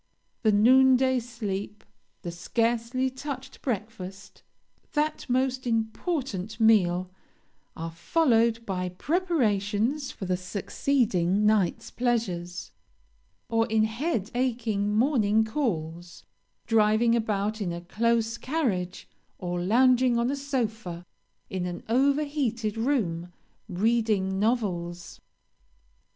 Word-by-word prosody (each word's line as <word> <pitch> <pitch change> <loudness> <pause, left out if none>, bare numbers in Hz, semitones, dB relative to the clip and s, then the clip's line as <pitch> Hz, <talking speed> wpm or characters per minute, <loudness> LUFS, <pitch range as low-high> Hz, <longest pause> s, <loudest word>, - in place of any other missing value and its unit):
The 220 - +4
noon 260 +5 +6
day 260 0 +2
sleep, 210 -4 -5 0.4
the 175 - -4
scarcely 230 +8 0
touched 265 0 -7
breakfast, 200 -5 -5 0.5
that 300 -2 -1
most 255 0 0
important 225 - -2
meal, 185 -5 +3 0.7
are 165 +1 -4
followed 230 - +2
by 185 -3 -2
preparations 250 - 0
for 195 - -7
the 180 0 0
succeeding 200 0 0
night's 210 -5 +1
pleasures, 180 -8 -2 0.8
or 225 0 +1
in 220 -1 +2
head 225 - -1
aching 225 -5 0
morning 220 -4 +3
calls, 175 - -3 0.4
driving 225 +1 +3
about 215 -1 -1
in 180 -4 -1
a 170 0 -5
close 230 +4 0
carriage, 210 - -2 0.3
or 175 -1 -3
lounging 250 +4 +4
on 235 +2 +1
a - - -1
sofa, 225 -11 -3 0.4
in 185 -1 -3
an 175 -1 -6
over 275 +5 +3
heated 235 -8 -2
room, 205 -9 -1 0.4
reading 205 -1 +1
novels. 180 -6 -2
220 Hz, 105 wpm, -27 LUFS, 190-250 Hz, 0.8 s, noon